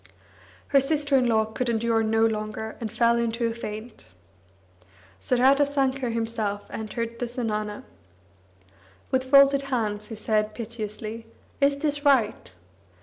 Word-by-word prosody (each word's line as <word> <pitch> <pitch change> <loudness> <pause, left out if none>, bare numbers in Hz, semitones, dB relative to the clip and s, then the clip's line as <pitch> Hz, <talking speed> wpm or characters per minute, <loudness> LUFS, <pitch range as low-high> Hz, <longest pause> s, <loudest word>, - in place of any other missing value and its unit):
Her 275 - +5
sister 285 0 0
in 255 -2 +3
law 220 -2 +3
could 235 +3 -3
endure 230 0 +1
no 225 0 +2
longer, 220 0 -3
and 220 -2 -4
fell 235 0 +3
into 235 0 -1
a 230 - 0
faint. 215 - -8 1.1
Saradasankar 270 - +2
himself 225 -3 -2
entered 230 +1 -5
the 245 - -2
zenana. 215 -4 -3 1.3
With 260 0 0
folded 275 0 +6
hands, 210 -4 -2
he 225 - -7
said 215 0 -1
piteously: 225 0 -6 0.3
"Is 280 0 +3
this 290 0 -1
right? 235 - +2
230 Hz, 125 wpm, -25 LUFS, 220-260 Hz, 1.3 s, folded